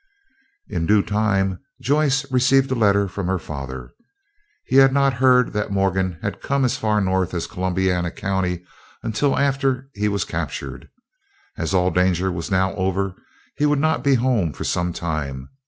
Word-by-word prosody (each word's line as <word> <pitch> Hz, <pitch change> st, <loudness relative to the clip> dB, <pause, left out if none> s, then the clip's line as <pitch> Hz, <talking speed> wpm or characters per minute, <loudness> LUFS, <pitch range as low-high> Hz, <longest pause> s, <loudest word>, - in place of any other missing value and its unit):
In 80 Hz, -, -2 dB
due 105 Hz, -1 st, +4 dB
time 100 Hz, -3 st, 0 dB, 0.2 s
Joyce 140 Hz, +1 st, +1 dB
received 130 Hz, +1 st, +3 dB
a -, -, +3 dB
letter 100 Hz, -4 st, +3 dB
from 95 Hz, 0 st, -4 dB
her 95 Hz, 0 st, +1 dB
father. 65 Hz, -6 st, -7 dB, 0.7 s
He 130 Hz, -, +1 dB
had 135 Hz, 0 st, +7 dB
not 140 Hz, 0 st, +3 dB
heard 125 Hz, -1 st, +4 dB
that 105 Hz, 0 st, -1 dB
Morgan 95 Hz, -2 st, 0 dB
had -, -, -4 dB
come 140 Hz, -1 st, +1 dB
as 125 Hz, +1 st, +1 dB
far 110 Hz, -5 st, +1 dB
north 95 Hz, -1 st, 0 dB
as 85 Hz, -, -2 dB
Columbiana 90 Hz, -1 st, -1 dB
County, 90 Hz, -1 st, -2 dB, 0.4 s
until 135 Hz, +6 st, 0 dB
after 135 Hz, -1 st, 0 dB
he 105 Hz, +1 st, -1 dB
was 100 Hz, -1 st, -1 dB
captured. -, -, -5 dB, 0.7 s
As -, -, -2 dB
all 90 Hz, 0 st, +3 dB
danger 90 Hz, +1 st, +1 dB
was 85 Hz, +1 st, -4 dB
now 95 Hz, -1 st, +1 dB
over, 95 Hz, 0 st, -1 dB, 0.4 s
he 150 Hz, -, +2 dB
would 145 Hz, 0 st, +2 dB
not 155 Hz, +2 st, +1 dB
be 140 Hz, -1 st, +4 dB
home 115 Hz, -, +1 dB
for -, -, -6 dB
some 90 Hz, 0 st, -1 dB
time. 75 Hz, -6 st, -4 dB
100 Hz, 165 wpm, -22 LUFS, 90-130 Hz, 0.7 s, had